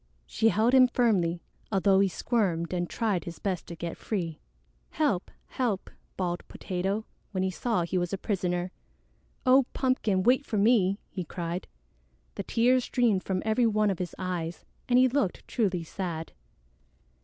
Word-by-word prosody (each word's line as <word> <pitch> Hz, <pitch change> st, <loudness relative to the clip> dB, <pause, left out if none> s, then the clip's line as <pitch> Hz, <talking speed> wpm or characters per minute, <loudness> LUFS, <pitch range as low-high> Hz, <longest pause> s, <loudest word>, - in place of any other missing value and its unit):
She 225 Hz, 0 st, +2 dB
held 225 Hz, +3 st, +2 dB
him 260 Hz, -1 st, +8 dB
firmly, 190 Hz, -9 st, +1 dB, 0.3 s
although 195 Hz, -1 st, +4 dB
he 195 Hz, -, +4 dB
squirmed 185 Hz, -5 st, 0 dB
and 175 Hz, -1 st, -1 dB
tried 205 Hz, -7 st, -1 dB
his 170 Hz, -, -7 dB
best 190 Hz, -3 st, -3 dB
to 170 Hz, -, -7 dB
get 170 Hz, 0 st, -5 dB
free. 170 Hz, -7 st, -3 dB, 0.5 s
"Help! 285 Hz, -, 0 dB, 0.2 s
Help!" 230 Hz, -7 st, -2 dB, 0.3 s
bawled 175 Hz, -2 st, -1 dB
Potato, 195 Hz, +3 st, -3 dB, 0.3 s
when 185 Hz, -1 st, 0 dB
he 190 Hz, -, 0 dB
saw 220 Hz, -1 st, 0 dB
he 175 Hz, +2 st, -1 dB
was 175 Hz, -1 st, -2 dB
a 195 Hz, -, -1 dB
prisoner. 180 Hz, -3 st, -1 dB, 0.7 s
"Oh, 260 Hz, 0 st, +6 dB
Pumpkin, 225 Hz, -8 st, +1 dB
wait 255 Hz, +5 st, +4 dB
for 220 Hz, -, -3 dB
me!" 200 Hz, -3 st, +4 dB
he 185 Hz, -, -4 dB
cried. 175 Hz, +1 st, -4 dB, 0.7 s
The -, -, -4 dB
tears 250 Hz, +2 st, +3 dB
streamed 235 Hz, -8 st, +2 dB
from 185 Hz, -1 st, -2 dB
every 220 Hz, +2 st, +3 dB
one 215 Hz, -1 st, +2 dB
of 190 Hz, -, -4 dB
his 180 Hz, -2 st, -4 dB
eyes, 175 Hz, -3 st, -4 dB, 0.2 s
and 245 Hz, -, +5 dB
he 255 Hz, +1 st, +6 dB
looked 250 Hz, -7 st, -1 dB
truly 190 Hz, -8 st, 0 dB
sad. 165 Hz, -1 st, -5 dB
195 Hz, 160 wpm, -28 LUFS, 175-230 Hz, 0.7 s, him